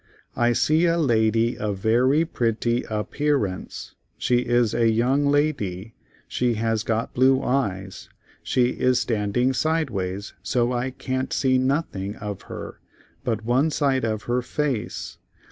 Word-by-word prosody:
I 120 0 +2
see 155 +7 +3
a 170 0 +2
la 115 -8 +3
dy 115 +2 +1
of 105 -2 -3
ver 115 +5 +2
y 155 +3 +3
pret 115 -8 -1
ty 120 0 +1
ap 105 -1 -3
pear 145 -5 +1
ance. 90 -1 -7 0.2
She 125 - +2
is 120 -2 +1
a 115 -1 +3
young 130 +6 +2
la 145 +2 +3
dy; 100 -4 -6 0.3
she 120 -2 0
has 115 0 0
got 115 0 -2
blue 130 +1 +3
eyes, 95 -8 -2 0.3
she 125 -1 +2
is 125 0 +1
stand 110 -3 -1
ing 125 +2 +3
sideways 110 - -1
so 120 0 0
I 125 +2 -1
can't 130 0 -3
see 130 -1 +2
noth 140 +3 0
ing 95 +2 -4
of 105 -3 -6
her - - -7 0.4
but 115 -4 -2
one 130 +6 +2
side 140 -4 +1
of 110 -2 -2
her 120 +1 0
face. 135 -2 -3
120 Hz, 165 wpm, -24 LUFS, 110-135 Hz, 0.4 s, see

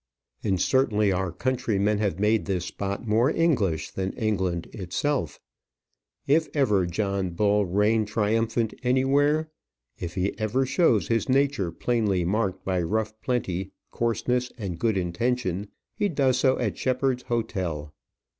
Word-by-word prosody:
And 95 -3 +1
certainly 105 -6 +2
our 95 -1 -1
countrymen 105 -2 0
have 100 -6 0
made 105 +2 +2
this 90 -3 -1
spot 100 +4 -4
more 115 +5 +3
English 110 - +1
than 95 0 -3
England 95 -7 -1
itself. 95 - -2 0.9
If 155 +3 +3
ever 105 -11 +2
John 100 +1 -1
Bull 100 +3 +2
reigned 105 +4 +2
triumphant 110 +1 0
anywhere; 140 +5 +2 0.5
if 85 -1 -5
he 95 +1 -1
ever 115 +5 +1
shows 130 - +2
his 115 -1 0
nature 135 -9 +2
plainly 100 -3 0
marked 100 0 -1
by 95 -2 0
rough 110 +5 -1
plenty, 95 -7 -2 0.2
coarseness, 125 +2 0
and 95 -7 -5
good 110 -4 +1
intention, 100 +1 -1 0.3
he 205 - 0
does 135 -5 +2
so 130 0 +3
at - - -2
Shepheard's 130 0 0
hotel. 95 - -3
110 Hz, 135 wpm, -26 LUFS, 95-125 Hz, 0.9 s, more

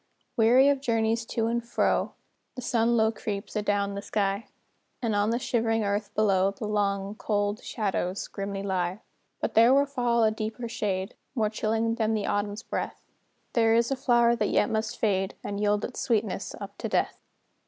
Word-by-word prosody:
Weary 245 +4 +6
of 280 -1 +2
journeys 225 -2 0
to 225 - -1
and 235 +1 0
fro, 235 - 0 0.4
The 250 - -6
sun 235 0 +2
low 220 0 +4
creeps 210 -1 -5
adown 205 -1 0
the 200 - -4
sky; 200 +1 -1 0.5
And 225 -4 -1
on 205 +1 +2
the 230 - +1
shivering 225 -2 0
earth 205 +1 -1
below, 195 -3 +3
The 200 +2 -6
long, 200 -1 0
cold 205 0 -1
shadows 195 -3 -2
grimly 195 0 -4
lie. 185 0 -1 0.4
But - - -1
there 235 +4 +6
will 280 +1 +4
fall 245 -4 +1
a 220 - +4
deeper 220 +2 -4
shade, 195 -4 -2 0.2
More 215 -4 +1
chilling 225 +1 0
than 225 -1 0
the 210 -2 -1
Autumn's 205 +2 -2
breath: - - -4 0.5
There 225 -1 +4
is 235 +2 +2
a - - +2
flower 240 -3 +3
that - - 0
yet - - +2
must 220 0 -1
fade, 195 -3 0
And 200 0 -4
yield 210 0 +1
its 250 - -7
sweetness 225 -4 -1
up - - -9
to - - -3
death. - - 0
220 Hz, 180 wpm, -27 LUFS, 205-230 Hz, 0.5 s, Weary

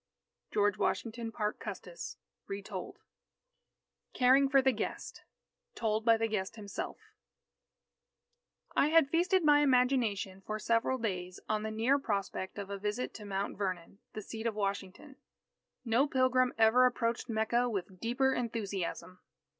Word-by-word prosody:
George 205 0 +2
Washington 230 0 -1
Parke 210 -1 -2
Custis - - -7 0.3
(Retold) 195 -1 -6 1.2
CARING 265 +2 +5
FOR 275 0 +5
THE 265 0 +4
GUEST 225 - -5 0.5
Told 220 -1 0
by 230 -1 +6
the 225 0 0
Guest 210 -1 -3
Himself 205 -3 -6 1.8
I - - +4
had 320 -3 +5
feasted 360 +2 +3
my 295 -1 +6
imagination, 250 -8 +2
for 215 +2 -4
several 230 +4 +1
days, 185 -6 -3
on 215 -1 0
the 220 - -3
near 230 +6 +2
prospect 200 -6 -3
of 200 -1 -6
a 200 - -4
visit 210 +5 -2
to 210 - -9
Mount 195 0 -3
Vernon, 185 -1 -3
the 215 - -6
seat 225 +2 -4
of 225 - -2
Washington. 200 +6 -4 0.7
No 240 +5 +3
pilgrim 255 -2 +3
ever 225 +3 +6
approached 235 -1 -2
Mecca 230 +2 +1
with 190 -3 -4
deeper 260 +5 +1
enthusiasm. 200 -6 -3
225 Hz, 135 wpm, -32 LUFS, 200-255 Hz, 1.8 s, by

